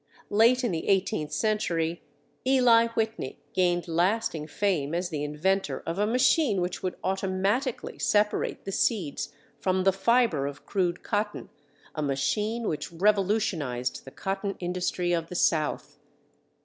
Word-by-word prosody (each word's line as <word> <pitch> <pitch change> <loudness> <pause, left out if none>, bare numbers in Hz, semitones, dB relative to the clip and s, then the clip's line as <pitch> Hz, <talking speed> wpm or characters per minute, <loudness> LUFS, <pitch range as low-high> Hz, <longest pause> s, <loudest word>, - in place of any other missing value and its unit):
Late 235 +5 +4
in 240 - +1
the 165 -2 -3
eighteenth 190 -5 +1
century, 175 -6 0 0.4
Eli 250 -3 +5
Whitney 220 -11 -2 0.2
gained 175 -1 +1
lasting 170 -2 0
fame 165 -4 0
as 175 +1 -1
the 150 -4 -3
inventor 150 0 -1
of 165 +3 -3
a 210 - +2
machine 250 - +3
which 180 0 -2
would 185 - -2
automatically 195 +7 -1
separate 210 0 +1
the 195 - -3
seeds 190 - -1 0.3
from 185 0 +1
the 195 0 +4
fiber 195 - +2
of 145 0 -8
crude 180 -3 -1
cotton—a 155 -9 -5
machine 210 - -1
which 155 - -3
revolutionized 180 - 0
the - - -10
cotton 195 +6 -3
industry 180 0 -1
of 165 -1 -1
the 180 - -8
south. 155 -3 0
185 Hz, 135 wpm, -27 LUFS, 165-210 Hz, 0.4 s, Eli